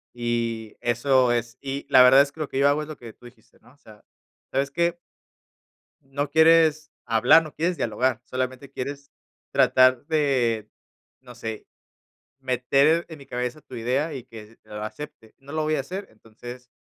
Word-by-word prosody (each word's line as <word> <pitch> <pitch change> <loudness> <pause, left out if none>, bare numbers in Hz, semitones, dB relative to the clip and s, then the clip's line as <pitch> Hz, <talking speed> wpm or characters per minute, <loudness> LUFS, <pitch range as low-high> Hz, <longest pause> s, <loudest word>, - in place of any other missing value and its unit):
Y 115 -2 -3
eso 125 +1 +2
es. 120 +1 -3
Y 140 0 -5
la 130 - +7
verdad 130 +2 +8
es 140 0 0
que 160 - -19
lo 155 - -2
que 135 - -3
yo 140 +1 +5
hago, 145 +2 +1
es 150 - -7
lo 155 - -7
que 115 -2 -11
tú 125 - -21
dijiste, 120 -2 -18
¿no? 120 +3 -22
O - - -28
sea, 110 -5 -17 0.5
¿sabes 140 0 0
qué? 170 +2 0 1.1
No 140 +1 -4
quieres 160 -1 +4
hablar, 125 +8 +5
no 155 - -10
quieres 175 +3 -1
dialogar, 125 +1 -1
solamente 130 +1 -4
quieres 140 +1 -6 0.4
tratar 130 +1 +4
de, 130 -8 0 0.5
no 125 -2 -14
sé, 110 -3 -7 0.7
meter 135 +5 +2
en 160 -3 -10
mi 140 - -14
cabeza 125 +4 -4
tu - - -14
idea 130 +7 -1
y 130 -4 -7
que 110 0 -13
lo 105 0 -8
acepte. 110 -1 -9
No 140 +1 -13
lo 155 0 -1
voy 155 0 0
a 140 - -1
hacer, 185 +9 -6
entonces, 120 +3 -12
130 Hz, 180 wpm, -24 LUFS, 120-145 Hz, 1.1 s, verdad